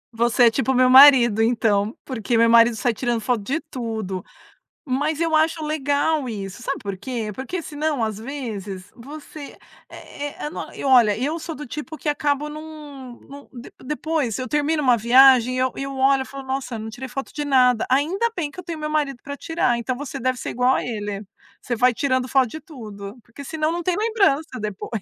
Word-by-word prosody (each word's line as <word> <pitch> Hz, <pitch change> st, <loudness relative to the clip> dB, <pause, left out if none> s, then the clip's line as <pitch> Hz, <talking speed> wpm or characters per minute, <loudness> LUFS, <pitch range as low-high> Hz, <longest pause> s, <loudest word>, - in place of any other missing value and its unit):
Você 235 Hz, +1 st, +3 dB
é 230 Hz, -, +6 dB
tipo 265 Hz, +3 st, 0 dB
o -, -, 0 dB
meu 255 Hz, 0 st, +4 dB
marido 255 Hz, -5 st, +8 dB
então, 225 Hz, -2 st, +1 dB
porque 235 Hz, -3 st, -1 dB
meu 230 Hz, 0 st, +5 dB
marido 235 Hz, 0 st, +6 dB
sai 235 Hz, +2 st, 0 dB
tirando 240 Hz, 0 st, -1 dB
foto 230 Hz, 0 st, -1 dB
de 275 Hz, +10 st, -1 dB
tudo. 220 Hz, -, -5 dB, 0.6 s
Mas 290 Hz, +4 st, -1 dB
eu 330 Hz, -1 st, 0 dB
acho 315 Hz, 0 st, +2 dB
legal 290 Hz, -1 st, 0 dB
isso, 200 Hz, 0 st, -6 dB
sabe 275 Hz, +3 st, -3 dB
por 200 Hz, -2 st, -4 dB
quê. 220 Hz, +1 st, -4 dB
Porque 300 Hz, -, -5 dB
senão 300 Hz, -5 st, -2 dB
às 215 Hz, -2 st, -2 dB
vezes 210 Hz, -7 st, -6 dB
você, 290 Hz, +3 st, -10 dB, 0.3 s
é 290 Hz, -, -8 dB
é 290 Hz, -, -7 dB
é -, -, -4 dB
não -, -, -7 dB
e -, -, -8 dB
olha, 240 Hz, -6 st, +5 dB
eu 295 Hz, +7 st, -2 dB
sou 325 Hz, 0 st, -6 dB
do 295 Hz, -, -8 dB
tipo 305 Hz, +5 st, -7 dB
que 300 Hz, -, -3 dB
acabo 290 Hz, 0 st, -1 dB
não 295 Hz, -5 st, -10 dB
não, 280 Hz, 0 st, -12 dB
de 240 Hz, -1 st, -10 dB
depois, 300 Hz, -5 st, -2 dB
eu 255 Hz, -, -4 dB
termino 300 Hz, +3 st, 0 dB
uma 250 Hz, -3 st, +4 dB
viagem 255 Hz, +1 st, +5 dB
eu 255 Hz, 0 st, +1 dB
eu 275 Hz, 0 st, -4 dB
olho, 265 Hz, 0 st, +3 dB
falo 275 Hz, 0 st, -9 dB
nossa, 265 Hz, -2 st, -3 dB
não 220 Hz, 0 st, -6 dB
tirei 245 Hz, +4 st, -7 dB
foto 270 Hz, +2 st, -6 dB
de 295 Hz, -, -3 dB
nada, 250 Hz, -4 st, +3 dB
ainda 325 Hz, -, +1 dB
bem 310 Hz, -5 st, -3 dB
que 365 Hz, -, -11 dB
eu 365 Hz, -, -7 dB
tenho 335 Hz, -2 st, -6 dB
meu 305 Hz, 0 st, -3 dB
marido 295 Hz, -4 st, -1 dB
para 285 Hz, 0 st, -7 dB
tirar, 265 Hz, -8 st, 0 dB
então 250 Hz, +2 st, -3 dB
você 290 Hz, -2 st, -6 dB
deve 255 Hz, +1 st, -1 dB
ser -, -, -5 dB
igual 250 Hz, +2 st, +2 dB
a -, -, -1 dB
ele, 210 Hz, -3 st, -5 dB, 0.5 s
vai 250 Hz, +1 st, +4 dB
tirando 260 Hz, 0 st, 0 dB
foto 260 Hz, -1 st, +3 dB
de 315 Hz, -, -7 dB
tudo, 215 Hz, -, -10 dB
porque 235 Hz, +6 st, -12 dB
senão 310 Hz, +1 st, -1 dB
não 345 Hz, +1 st, -2 dB
tem 360 Hz, 0 st, 0 dB
lembrança 395 Hz, -, +1 dB
depois. 210 Hz, +1 st, -5 dB
260 Hz, 205 wpm, -22 LUFS, 230-295 Hz, 0.6 s, marido